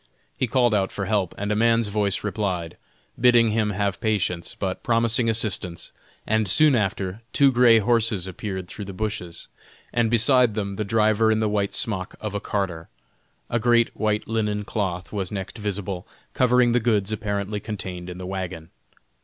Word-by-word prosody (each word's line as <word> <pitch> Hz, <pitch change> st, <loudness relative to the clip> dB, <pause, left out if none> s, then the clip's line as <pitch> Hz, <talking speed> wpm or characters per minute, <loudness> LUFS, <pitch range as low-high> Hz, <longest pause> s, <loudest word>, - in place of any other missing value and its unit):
He 130 Hz, -, -1 dB
called 120 Hz, -1 st, +2 dB
out 95 Hz, -2 st, +1 dB
for 100 Hz, -, -4 dB
help; 100 Hz, -3 st, 0 dB
and 100 Hz, +1 st, -2 dB
a -, -, +1 dB
man's 115 Hz, 0 st, +3 dB
voice 100 Hz, -2 st, 0 dB
replied, 95 Hz, -6 st, -2 dB, 0.4 s
bidding 120 Hz, -2 st, +5 dB
him 110 Hz, -1 st, +1 dB
have 100 Hz, -1 st, -2 dB
patience, 95 Hz, -6 st, -1 dB
but 95 Hz, -2 st, -3 dB
promising 115 Hz, 0 st, +2 dB
assistance; 100 Hz, -6 st, -2 dB, 0.3 s
and 110 Hz, -1 st, +1 dB
soon 150 Hz, -, +5 dB
after, 95 Hz, -2 st, -1 dB
two 140 Hz, -1 st, +5 dB
gray 120 Hz, -2 st, +6 dB
horses 110 Hz, -4 st, +1 dB
appeared 95 Hz, 0 st, -5 dB
through 100 Hz, +2 st, -7 dB
the 100 Hz, -, -7 dB
bushes, 90 Hz, -5 st, -4 dB, 0.5 s
and 120 Hz, -2 st, +2 dB
beside 120 Hz, 0 st, +4 dB
them 100 Hz, -2 st, -3 dB
the 105 Hz, -, -2 dB
driver 110 Hz, +1 st, +2 dB
in 110 Hz, -, +2 dB
the 110 Hz, -, +1 dB
white 100 Hz, -1 st, -1 dB
smock 95 Hz, -5 st, -2 dB
of 105 Hz, -2 st, -5 dB
a 100 Hz, -, -1 dB
carter; 95 Hz, -6 st, -3 dB, 0.6 s
a 120 Hz, -, 0 dB
great 120 Hz, 0 st, +3 dB
white 105 Hz, -1 st, -1 dB
linen 105 Hz, -2 st, -1 dB
cloth 95 Hz, -4 st, -3 dB
was 95 Hz, -3 st, -3 dB
next 100 Hz, +2 st, -5 dB
visible, 100 Hz, -3 st, -4 dB, 0.3 s
covering 125 Hz, -1 st, +3 dB
the 120 Hz, -, +3 dB
goods 110 Hz, -3 st, +1 dB
apparently 105 Hz, -1 st, -2 dB
contained 95 Hz, -4 st, -6 dB
in 90 Hz, -, -7 dB
the 90 Hz, -, -7 dB
wagon. 90 Hz, -4 st, -5 dB
105 Hz, 170 wpm, -24 LUFS, 95-115 Hz, 0.6 s, gray